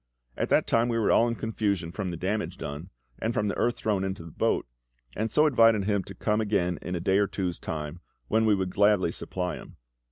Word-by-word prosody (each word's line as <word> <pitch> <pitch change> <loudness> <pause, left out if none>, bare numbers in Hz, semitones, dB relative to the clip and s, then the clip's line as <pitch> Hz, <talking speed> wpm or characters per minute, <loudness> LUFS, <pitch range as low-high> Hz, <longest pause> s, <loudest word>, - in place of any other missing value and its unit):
At - - -2
that - - +4
time 115 +1 +2
we 115 - 0
were 110 - +2
all 115 - +5
in 115 - -1
confusion 100 -7 -2
from 95 +1 -3
the 85 - -4
damage 105 +5 -2
done, 75 +6 -6 0.3
and 115 +1 -1
from 105 -1 +1
the - - -2
earth 120 +1 0
thrown 100 -3 0
into 95 -3 -4
the 85 - -10
boat, - - 0 0.5
and 110 +1 -1
so 150 +7 +4
invited 115 -7 +5
him 100 -1 0
to 95 - -9
come 105 +4 0
again 90 -5 0
in 90 - -4
a - - -2
day 95 +3 +2
or 100 - +3
two's 90 -4 -3
time, 75 +1 -5 0.3
when 110 +1 +2
we 105 - +5
would 95 -2 -2
gladly 100 -3 +3
supply 90 +1 -3
him. - - -13
100 Hz, 230 wpm, -27 LUFS, 90-110 Hz, 0.5 s, all